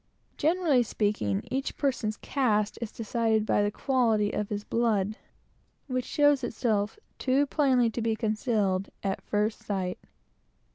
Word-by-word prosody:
Generally 320 -5 +3
speaking, 205 - -1
each 265 +2 -2
person's 235 -7 -1
caste 215 -6 0
is 230 - -4
decided 225 -1 0
by 205 - +2
the 205 - +2
quality 225 -3 +1
of 210 - -1
the 205 -1 -4
blood, 215 -3 +1 0.7
which 255 -2 -2
shows 290 -2 +3
itself, 220 -3 -1 0.2
too 270 +2 +2
plainly 260 -5 +2
to 235 - -3
be 225 0 +1
concealed, 215 -4 0
at 195 -1 -1
first 210 +1 -1
sight. 185 -3 -3
220 Hz, 135 wpm, -28 LUFS, 210-255 Hz, 0.7 s, Generally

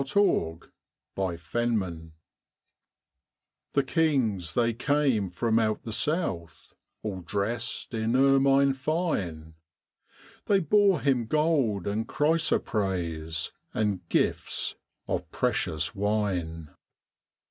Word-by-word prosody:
Christmas 135 - +1 0.4
Carol 95 -2 -2 1.6
The 140 - +3
kings 125 - +1
they 115 -1 +2
came 130 -5 +1
from 110 +5 +1
out 110 -1 0
the 115 - -6
south, 115 - -2 0.3
All 95 -4 -4
dressed 100 +8 -3
in 110 +1 0
ermine 135 +1 +4
fine, 130 - -2 0.9
They 200 -1 +4
bore 195 -1 +3
Him 125 -4 +1
gold 140 - +1
and 105 +2 -2
chrysoprase, 95 - 0 0.2
And 100 -5 -1
gifts - - 0 0.3
of - - -2
precious 80 +1 0
wine. 95 -7 -1
110 Hz, 90 wpm, -27 LUFS, 90-140 Hz, 1.6 s, ermine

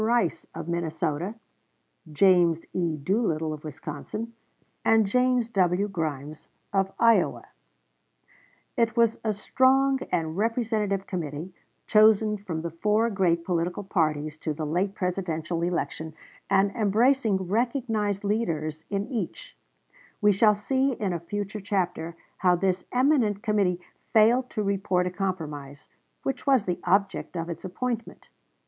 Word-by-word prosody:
Rice, 230 -5 +1
of 165 -1 -6
Minnesota; 170 +2 -2 0.8
James 170 -1 +4
E. 170 -4 -1
Doolittle, 160 -2 0
of 150 - -9
Wisconsin, 155 - -6 0.5
and 225 -1 +4
James 250 +2 +2
W. 190 -1 +2
Grimes, 155 -5 -4 0.3
of 195 -1 +1
Iowa. 230 -1 +3 1.3
It 235 -1 +1
was 230 -1 +3
a 220 - +1
strong 265 +5 +3
and 160 -1 -1
representative 215 -3 0
committee, 165 0 -5 0.3
chosen 215 0 +5
from 170 -6 -5
the 170 - -3
four 210 +7 +1
great 170 -4 +1
political 180 +2 -1
parties 155 -5 -1
to 155 -1 -3
the 155 - -3
late 185 +6 -1
Presidential 175 -3 -2
election, 160 -2 -2 0.3
and 195 0 +3
embracing 225 +2 +2
recognized 220 -2 0
leaders 160 -8 -2
in 200 0 -1
each, 220 -9 -5 0.6
We 210 -1 +5
shall 210 +2 +4
see 265 +6 +1
in 205 -6 -2
a 170 - -2
future 205 +4 -5
chapter 180 -4 -2 0.2
how 180 -1 +3
this 185 0 0
eminent 250 -6 +2
committee 200 -5 +1 0.3
failed 235 +4 +4
to 215 - -2
report 195 -2 0
a 180 - -2
compromise, 155 -7 -5 0.3
which 270 - -3
was 265 -6 +4
the 180 -1 -2
object 195 -2 +1
of 165 +1 -3
its 170 -1 -6
appointment. 230 +5 -4
195 Hz, 130 wpm, -26 LUFS, 170-220 Hz, 1.3 s, chosen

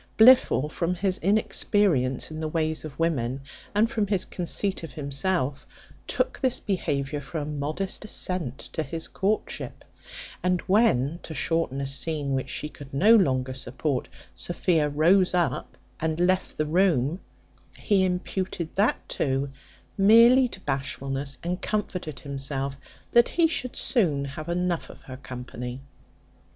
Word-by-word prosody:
Blifil, 225 - +6
from 170 +3 -1
his 185 +1 0
inexperience 190 - +2
in 155 - -6
the 160 - -2
ways 160 0 -1
of 150 -3 -8
women, 135 -6 0 0.3
and 215 +2 +4
from 215 -3 -1
his 195 -2 0
conceit 190 +2 -1
of 165 - -8
himself, 140 0 -1 0.4
took - - -1
this 260 -3 +1
behaviour 145 -7 -2
for 140 +4 -6
a 150 - -2
modest 150 +8 -3
assent 180 - -2 0.2
to 160 - -1
his 160 +2 -5
courtship; 205 +3 -2 0.6
and 180 -1 +1
when, 170 - +2
to 160 - -8
shorten 165 -5 0
a 140 - -2
scene 140 +1 -2
which 130 0 -2
she 150 - -3
could 145 -2 -12
no 205 +12 +6
longer 130 - +2
support, 130 +1 -3 0.2
Sophia 170 -3 0
rose 175 +6 +3
up 175 -2 -1 0.2
and 160 0 -1
left 185 +1 +1
the 155 - +1
room, 165 -2 +2 0.6
he 200 -3 +2
imputed 180 -2 -2
that, 205 +3 +1
too, 135 0 -1 0.5
merely 230 +6 +7
to 190 - -9
bashfulness, 135 -1 -3
and 180 +2 -2
comforted 180 -9 -3
himself 140 -1 -2 0.4
that 235 0 +5
he 340 - +3
should 255 -6 -2
soon 175 - +1
have 155 +4 -7
enough 175 0 -1
of - - -13
her 130 -1 -9
company. 125 -1 -7
160 Hz, 140 wpm, -26 LUFS, 140-190 Hz, 0.6 s, merely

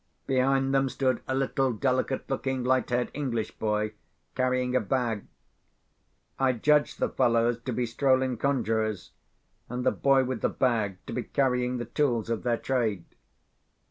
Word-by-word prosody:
Behind 135 +1 +2
them 135 0 +2
stood 130 0 0
a 130 - -1
little 135 0 +1
delicate 130 +3 -1
looking 135 -1 -2
light 130 +1 +1
haired 120 0 0
English 120 -7 -2
boy 105 0 0 0.4
carrying 130 0 0
a - - +5
bag. 115 -2 -1 1.1
I 135 -1 +3
judged 150 +5 +2
the - - +1
fellows 120 -1 +2
to 130 - -2
be 125 +1 0
strolling 130 +1 +1
conjurors, 110 -6 -1 0.6
and 125 +1 -3
the - - +4
boy 135 -1 +3
with 130 -2 -3
the - - +2
bag 110 -7 0
to - - -6
be 125 - -1
carrying 125 0 0
the 120 - -4
tools 120 -3 0
of 115 - -1
their 120 -2 0
trade. 115 -10 -1
125 Hz, 155 wpm, -27 LUFS, 115-135 Hz, 1.1 s, a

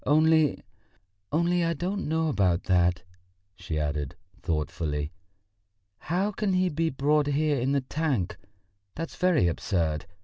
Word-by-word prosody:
Only... 155 +1 +3 0.7
only 170 +2 +2
I 165 0 0
don't 190 +5 -2
know 160 +1 +1
about 95 - +2
that," 90 -1 +2 0.5
she 80 -3 -5
added 75 -2 -2 0.3
thoughtfully. 75 -1 -2 0.9
"How 185 +6 0
can 205 -1 -1
he 185 0 +2
be 165 +1 0
brought 145 +2 +2
here 145 0 +1
in 130 +3 0
the 140 - +2
tank? 130 - -1 0.6
That's 165 0 -5
very 180 - +3
absurd. 80 -2 -1
145 Hz, 130 wpm, -27 LUFS, -, 0.9 s, Only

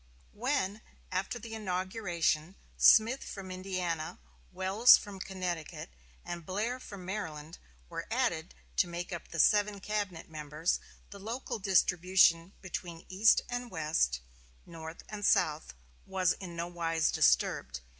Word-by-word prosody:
When, 220 -4 -1 0.3
after 190 +5 -2
the 225 -1 -9
inauguration, 185 -4 -1 0.2
Smith 230 +5 +6
from 190 -2 -7
Indiana 185 -4 -3 0.3
Welles 200 +6 +6
from 200 -2 -9
Connecticut, 180 - -5 0.3
and 170 -1 -5
Blair 215 +9 -2
from 200 -7 -9
Maryland 165 -5 -5 0.3
were - - -6
added 60 - -1 0.2
to - - +4
make 175 +1 -5
up 170 - -6
the 165 - -6
seven 205 +1 +4
cabinet 200 -4 -3
members, 155 +1 -2 0.3
the 200 - -9
local 230 +3 -4
distribution 180 -2 +4
between 175 -2 -6
East 195 +4 +5
and 245 0 -4
West, 155 - 0 0.4
North 160 -1 -9
and 210 -1 -7
South, 155 - +2 0.3
was 185 -2 +2
in 175 -3 -8
no 170 0 -3
wise 165 -2 0
disturbed. - - +2
185 Hz, 125 wpm, -31 LUFS, 165-205 Hz, 0.4 s, Smith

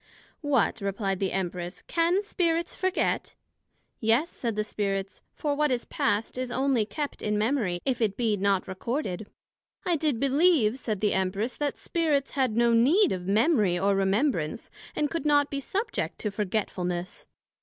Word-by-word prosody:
What, 265 -7 +1
replied 195 -1 -1
the 195 -2 0
Empress, 180 -1 -4
Can 345 +4 +1
Spirits 340 -4 0
forget? 375 +1 -1 0.6
Yes, 235 +9 +2
said 230 -3 -3
the 215 - 0
Spirits; 195 -2 -3
for 295 -2 -1
what 300 +1 +1
is 250 -2 -1
past, 220 +4 -1
is 255 -1 -3
onely 260 -5 +1
kept 290 +4 -4
in 210 0 0
memory, 215 -6 0
if 255 -2 0
it 210 -3 +1
be 225 -3 +1
not 200 -1 +1
recorded. 210 - -3 0.6
I 355 -2 +2
did 295 -6 0
believe, 275 -4 +3
said 215 -6 -3
the 210 - +2
Empress, 195 +5 -1
That 290 -1 -2
Spirits 305 -5 0
had 255 -5 0
no 235 0 +4
need 305 - +4
of 180 -1 -3
Memory, 210 - +3
or 200 +2 +2
Remembrance, 195 - 0 0.2
and 295 -1 0
could 335 - -2
not 290 -1 +3
be 280 - -2
subject 400 - -2
to 210 - -1
Forgetfulness. 185 -3 -3
230 Hz, 160 wpm, -27 LUFS, 200-290 Hz, 0.6 s, no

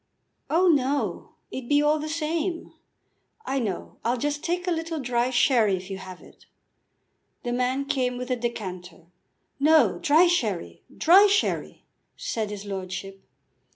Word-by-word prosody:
"Oh, 350 +4 +3
no; 285 -3 0 0.2
it'd 255 -2 -6
be 290 0 +4
all 300 +1 +2
the 305 +1 -4
same, 330 +2 -2 0.7
I 270 +1 -1
know. 205 -7 -4
I'll 240 +2 +1
just 290 +4 -2
take 350 +1 -1
a 360 - 0
little 325 -1 -2
dry 245 -2 0
sherry 240 -5 +3
if 185 +2 -9
you 190 - -5
have 185 -1 -10
it." - - -19 1.0
The 240 - -2
man 255 +3 0
came 250 -3 -1
with 250 +1 -5
the 255 - +1
decanter. 185 -8 -6 0.5
"No, 275 - +4
dry 315 +5 +5
sherry; 215 - -1 0.2
dry 380 +5 +7
sherry," 410 +2 0 0.3
said 220 -2 -3
his 205 -1 -7
lordship. 195 0 -6
255 Hz, 150 wpm, -25 LUFS, 205-310 Hz, 1.0 s, dry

